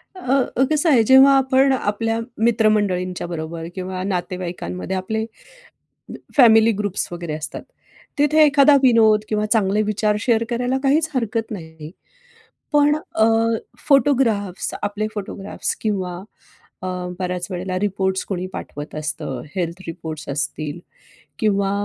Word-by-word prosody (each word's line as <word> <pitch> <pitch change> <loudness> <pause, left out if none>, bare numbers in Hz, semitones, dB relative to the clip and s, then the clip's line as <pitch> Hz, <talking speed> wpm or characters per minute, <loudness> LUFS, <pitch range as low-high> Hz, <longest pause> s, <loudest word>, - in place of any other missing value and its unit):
अ, 315 -9 -4 0.3
अ, 260 - +4
कसं 310 +2 +2
आहे? 250 -7 +5
जेव्हा 265 +4 +7
आपण 265 0 +3
आपल्या 225 -1 -1 0.2
मित्रमंडळींच्या 205 -6 +1
बरोबर 165 -1 -5
किंवा 185 0 -4
नातेवाईकांमध्ये 180 0 -4
आपले 220 +4 -2 1.1
फॅमिली 225 -4 +6
ग्रुप्स 205 -2 -2
वगैरे 170 -2 -5
असतात. 155 -1 -6 0.6
तिथे 300 +2 +4
एखादा 285 0 +5
विनोद 225 -4 +5
किंवा 215 -1 0
चांगले 210 -2 +2
विचार 210 0 0
शेअर 230 0 +2
करायला 245 +2 0
काहीच 300 +3 +2
हरकत 230 -2 -2
नाही. 160 -6 -8 0.8
पण 295 0 +4
अ, 220 -7 -1 0.6
फोटोग्राफ्स 245 - +2
आपले 205 +1 -2
फोटोग्राफ्स 200 -1 -4
किंवा 190 -5 -2 0.7
अ, - - -4 0.3
बऱ्याच 180 -1 -3
वेळेला 185 0 -3
रिपोर्ट्स 190 -1 -1
कोणी 185 -2 -4
पाठवत 145 +1 -7
असतं. 150 -4 -4
हेल्थ 175 0 -3
रिपोर्ट्स 160 -2 -7
असतील 145 +2 -3 0.6
किंवा 200 -2 +1
205 Hz, 120 wpm, -21 LUFS, 180-235 Hz, 1.1 s, जेव्हा